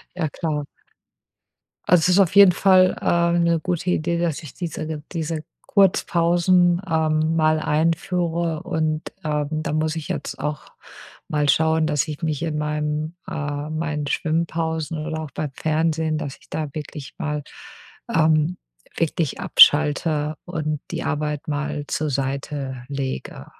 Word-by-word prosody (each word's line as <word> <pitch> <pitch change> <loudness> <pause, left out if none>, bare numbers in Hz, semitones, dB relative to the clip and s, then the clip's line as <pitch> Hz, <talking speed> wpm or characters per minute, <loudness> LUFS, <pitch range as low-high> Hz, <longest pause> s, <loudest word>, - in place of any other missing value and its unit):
Ja 165 -4 -1
klar. 150 -1 -3 1.2
Also, 180 -1 +7
es 160 - +2
ist 180 - +4
auf 185 -1 +3
jeden 200 -2 +9
Fall, 185 0 +5
ähm, 170 0 +2
'ne 170 -1 +2
gute 180 +1 -2
Idee, 170 -1 0
dass 170 -3 -1
ich 155 - -10
diese 160 -3 -5
ge 155 -1 -4
diese 160 -2 -3 0.3
Kurzpausen, 175 -2 +3
ähm, 160 -1 +1
mal 155 -1 +3
einführe 165 +1 0
und, 160 -3 -1 0.2
ähm, 150 -1 -1
da 155 -1 -2
muss 155 +1 0
ich 160 - -5
jetzt - - -4
auch 150 -1 -4 0.6
mal 150 -1 0
schauen, 160 +1 +3
dass 150 0 +1
ich 150 -1 -6
mich 155 -2 -1
in 155 -2 -2
meinem 150 +1 -2
äh, 145 -4 -4
meinen 155 -2 -2
Schwimmpausen 160 0 -1
oder 160 -1 -3
auch 155 - -7
beim 150 0 -4
Fernsehen, 160 0 0
dass 140 -3 -5
ich - - -24
da 155 -1 -3
wirklich 150 -4 -7
mal, 150 -1 -3 0.7
ähm, 160 +2 +3 0.4
wirklich 165 -1 -1
abschalte 150 -3 +4
und 155 -4 -3
die - - -3
Arbeit 150 0 -2
mal 145 0 -2
zur 155 -1 -1
Seite 135 -1 -3
lege. 135 -2 -5
155 Hz, 145 wpm, -22 LUFS, 150-170 Hz, 1.2 s, jeden